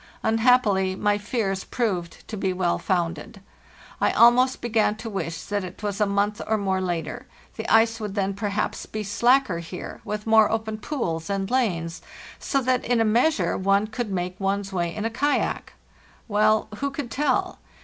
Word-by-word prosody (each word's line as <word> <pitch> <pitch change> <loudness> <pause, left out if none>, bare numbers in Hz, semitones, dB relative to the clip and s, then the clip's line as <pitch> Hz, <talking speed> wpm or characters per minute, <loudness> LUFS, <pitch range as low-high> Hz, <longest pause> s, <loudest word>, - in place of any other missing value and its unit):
Unhappily 220 -5 +3
my 205 +1 +1
fears 205 -3 -2
proved 185 -9 -3
to 220 - -5
be 190 -2 -1
well 180 -1 0
founded. 175 +3 -2 0.6
I - - +3
almost 250 +2 +5
began 220 -3 +1
to 225 +1 -7
wish 165 -4 -3
that 205 -1 -2
it 185 +3 -9
was 205 0 -2
a 210 - +4
month 205 +1 0
or 220 - +2
more 190 -2 0
later; 180 +8 -3 0.3
the 220 - -5
ice 225 +1 +4
would 210 -2 -5
then 195 -1 0
perhaps 205 0 -2
be 215 0 -4
slacker 230 -1 +2
here, 170 +2 -8
with 210 0 -4
more 220 -1 +5
open 220 -1 -2
pools 180 - -3
and 195 +1 -2
lanes, 180 -10 0 0.4
so 275 - 0
that 255 0 +1
in 240 -1 +1
a 225 - +3
measure 220 - +2
one 195 +2 +2
could 220 0 -4
make 180 0 -3
one's 195 0 -1
way 175 -2 -1
in 210 +1 -3
a 225 - -1
kayak. 285 +5 -1 0.5
Well, 215 0 +3
who 280 +5 -1
could 275 -3 -6
tell? 295 +5 0
210 Hz, 175 wpm, -24 LUFS, 190-230 Hz, 0.6 s, almost